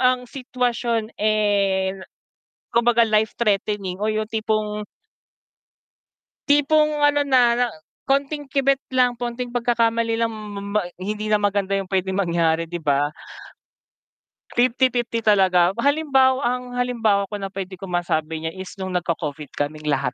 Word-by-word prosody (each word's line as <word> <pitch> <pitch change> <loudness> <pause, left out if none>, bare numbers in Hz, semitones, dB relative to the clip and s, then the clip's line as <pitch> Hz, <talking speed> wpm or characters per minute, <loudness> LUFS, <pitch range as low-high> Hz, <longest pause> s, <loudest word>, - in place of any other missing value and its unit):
ang 250 0 +2
sitwasyon 245 -3 -2
eh 200 -3 +2 0.8
kumbaga 235 0 +4
life 215 0 +2
threatening 200 -3 -1
o 215 - 0
yung 215 0 -1
tipong 215 -1 -2 1.7
tipong 295 +1 +3
ano 290 0 +3
na 265 -3 +4
na 245 +1 +2 0.4
konting 280 +1 0
kibet 275 0 +2
lang, 250 -1 +3
konting 240 +1 -5
pagkakamali 230 -1 +1
lang 230 - +2
ma 210 -2 -7
ma 200 +1 -1 0.2
hindi 210 +2 -3
na 210 - +5
maganda 200 -1 0
yung 195 -1 -4
pwedeng 190 0 -1
mangyari, 165 -3 +1
di 175 0 -6
ba? 145 0 +1 1.4
50-50 245 -1 +1
talaga, 185 -4 +4
halimbawa 270 -3 +3
ang 250 +1 0
halimbawa 225 -5 +1
ko 210 - -5
na 195 -1 -4
pwede 190 -1 -6
ko 195 - -6
masabi 160 -2 -1
niya 160 - -1
is 190 0 -8
nung 190 -1 -4
nag-co-Covid 160 -4 -3
kaming 150 +1 -3
lahat, 135 -3 0
215 Hz, 135 wpm, -22 LUFS, 190-245 Hz, 1.7 s, na